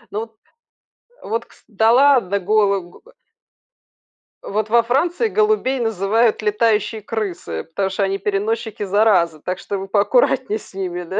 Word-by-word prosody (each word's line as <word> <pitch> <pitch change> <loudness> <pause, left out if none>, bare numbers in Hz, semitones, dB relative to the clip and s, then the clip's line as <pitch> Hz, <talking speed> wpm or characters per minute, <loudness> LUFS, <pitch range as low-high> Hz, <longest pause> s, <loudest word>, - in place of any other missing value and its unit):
Ну 210 - -3
вот 225 0 -9 0.9
Вот, 230 +2 -3
кста - - -24
Да, 220 +1 +2
ладно 250 -7 +4
голого 200 -2 0 1.4
Вот 215 +1 -2
во 235 +1 +4
Франции 340 - 0
голубей 425 -13 +1
называют 225 +1 +1
"летающие 215 0 0
крысы", 195 - -4
потому 190 +4 -3
что 195 +1 -2
они 195 0 0
переносчики 210 +3 -2
заразы, 190 -5 +2
так 185 +4 -4
что 200 - -5
вы 195 0 -6
поаккуратнее 215 +3 +1
с - - -17
ними, 180 -2 -4
да. 190 +4 -3
210 Hz, 140 wpm, -19 LUFS, 195-230 Hz, 1.4 s, ладно